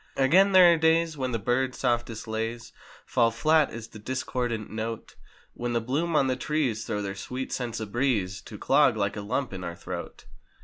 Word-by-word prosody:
Again, 180 +9 +5
there 180 -2 +8
are - - +1
days 160 0 +2
when 130 -3 -2
the 115 - 0
birds' 125 +4 0
softest 120 -3 -1
lays 115 +2 -4 0.3
Fall 120 -2 +3
flat 155 +7 +3
as 115 -1 -8
the 110 - -11
discordant 120 -1 -3
note; 110 +1 -5 0.4
When 120 0 -3
the 115 - +2
bloom 150 +8 -1
on 140 - +4
the 130 -1 +1
trees 130 -6 -1
throw 105 -2 -2
their 100 -1 -3
sweet 125 +7 -6
scents 120 -3 -3
a 110 - -3
breeze. 105 -4 -1
To - - -9
clog 110 - +3
like 100 -1 -1
a 105 - -4
lump 125 +3 -2
in 95 -1 -6
our 85 -1 -5
throat. - - -7
120 Hz, 195 wpm, -27 LUFS, 110-135 Hz, 0.4 s, there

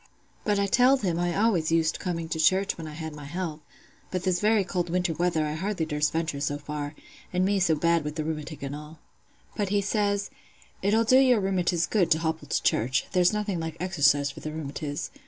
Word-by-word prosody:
"But 210 -1 +1
I 200 - +2
telled 250 +5 +4
him 175 -3 0
I 175 0 0
always 195 -7 +2
used 165 -1 +2
coming 165 -3 -3
to 160 - -3
church 190 +5 +3
when 165 -1 -7
I 155 - -8
had 160 0 -6
my 150 -1 -9
health; 165 0 -4 0.5
but 185 -1 -3
this 185 -2 +1
very 215 -1 +3
cold 175 -1 -2
winter 180 -1 0
weather 165 -1 0
I 150 - -2
hardly 185 +1 -2
durst 150 -1 0
venture 160 -3 -2
so 145 0 -1
far—and 150 +5 -5
me 200 0 +2
so 170 -4 +3
bad 170 +1 +2
wi' 150 - -2
th' 150 0 -4
rheumatic 155 -1 -5
and 140 +1 -4
all. 150 +2 -10 0.6
"But 205 -2 -1
he 205 +1 +2
says, 205 0 0 0.5
'It'll 215 +4 +3
do 255 +3 +5
your 255 -4 +5
rheumatiz 180 -3 +1
good 185 -4 +1
to 160 - +4
hobble 160 -2 -3
to - - -1
church: 130 +4 +1
there's 180 -1 +4
nothing 210 -4 -2
like 160 0 -5
exercise 145 -5 +2
for - - -11
the 155 - -5
rheumatiz. 145 -1 -5
170 Hz, 210 wpm, -27 LUFS, 155-195 Hz, 0.6 s, do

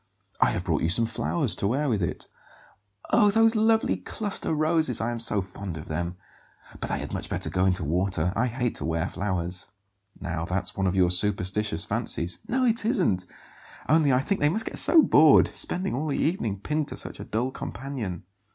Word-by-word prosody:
I - - +4
have - - -2
brought - - 0
you 80 - +1
some 115 +7 +3
flowers 120 +4 +1
to 100 - 0
wear 140 +7 0
with 110 -7 0
it." 85 - -3 0.8
"Oh, 210 -3 +5
those 225 +2 +4
lovely 220 +1 +2
cluster 205 -6 -3
roses; 155 -4 +2
I 115 +2 -1
am 120 - -4
so 105 -4 +3
fond 95 -2 -7
of 80 - -9
them! 85 +3 -3 0.6
But - - -4
they - - -1
had - - -6
much - - -4
better - - -1
go 90 0 +1
into 90 -3 +1
water. 90 +2 0
I 125 +3 +1
hate 120 0 -2
to - - -4
wear 80 +2 -1
flowers." 90 -3 -3 0.5
"Now 85 -3 -3
that's 90 +2 -3
one 95 -1 0
of 90 - 0
your 90 -2 +3
superstitious 95 -1 0
fancies." 85 +1 -2
"No, 255 +1 +1
it 230 -2 +1
isn't; 175 - +1 0.6
only 155 -2 +4
I 125 0 +3
think 195 +8 -2
they 145 - +4
must 220 +7 -2
get - - -5
so 325 -2 +5
bored, 155 - +6
spending 190 +2 -2
all 150 +5 -2
the 145 - -1
evening 115 - -1
pinned 150 +6 -1
to - - -6
such - - -6
a - - -6
dull 120 +5 -2
companion." 120 -11 -6
115 Hz, 200 wpm, -26 LUFS, -, 0.8 s, bored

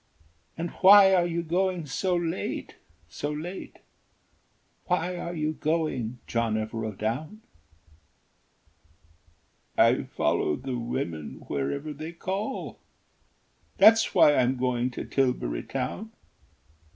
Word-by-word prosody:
And 170 0 -3
why 195 0 +9
are 175 -2 +3
you 170 0 -2
going 180 0 0
so 180 +6 -1
late, 165 - -3 0.3
so 145 - -4
late, 170 +5 -7 1.1
Why 180 0 0
are 175 0 -5
you 155 -1 -1
going, 155 -8 -1
John 115 -2 0
Evereldown?" 110 - -3 2.4
"I - - +5
follow 75 - 0
the 130 -2 -4
women 100 - -4
wherever 140 - -3
they 155 +3 -7
call, 195 +8 -4 1.0
That's 220 +3 +6
why 145 - +7
I'm 130 +1 +2
going 125 0 0
to 125 - -6
Tilbury 125 - 0
Town. 135 +12 -4
150 Hz, 105 wpm, -27 LUFS, 120-175 Hz, 2.4 s, why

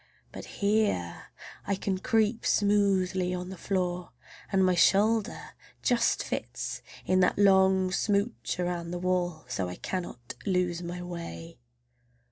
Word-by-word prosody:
But - - -8 0.2
here 200 - 0 0.4
I 200 - +1
can 190 -1 -2
creep 225 +2 +1
smoothly 190 -3 +2
on 180 0 -5
the 190 - -6
floor, 180 -1 -2 0.4
and 190 -1 +3
my 185 - +3
shoulder 205 +4 +2 0.3
just 235 -2 +2
fits - - -4 0.2
in 185 - +3
that 180 - +3
long 190 -2 +4
smooch 200 0 -1
around 175 -1 -2
the 175 - -3
wall, 180 -4 -1
so 95 -7 -2
I 90 - -6
cannot 150 - -5
lose 180 -3 0
my 175 +1 -5
way. 170 -2 -7
185 Hz, 130 wpm, -28 LUFS, 175-200 Hz, 0.4 s, long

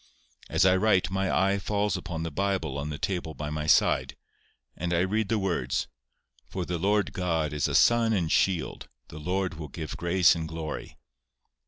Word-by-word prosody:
As 95 - +3
I 95 0 +5
write, 95 -3 +2
my 95 0 0
eye 100 +1 +2
falls 105 +1 0
upon 90 -3 -4
the 85 - -4
Bible 95 -4 -1
on 70 +1 -3
the 75 - -4
table 85 -2 -3
by 75 0 -5
my 75 0 -3
side, - - +3 0.6
and 85 +1 -2
I 85 - +2
read 100 +2 0
the 115 - +2
words, 85 -11 -1 0.6
"For 90 -2 -4
the 85 -1 -3
Lord 105 +3 +1
God 80 -5 -1
is 75 - 0
a - - -2
sun 120 -1 +4
and 85 -7 0
shield, 95 -4 0 0.2
the 75 - -9
Lord 90 0 -2
will 75 - -5
give 80 +2 -6
grace 85 +1 +4
and 80 -2 -4
glory." 80 -1 -6
90 Hz, 185 wpm, -27 LUFS, 80-95 Hz, 0.6 s, I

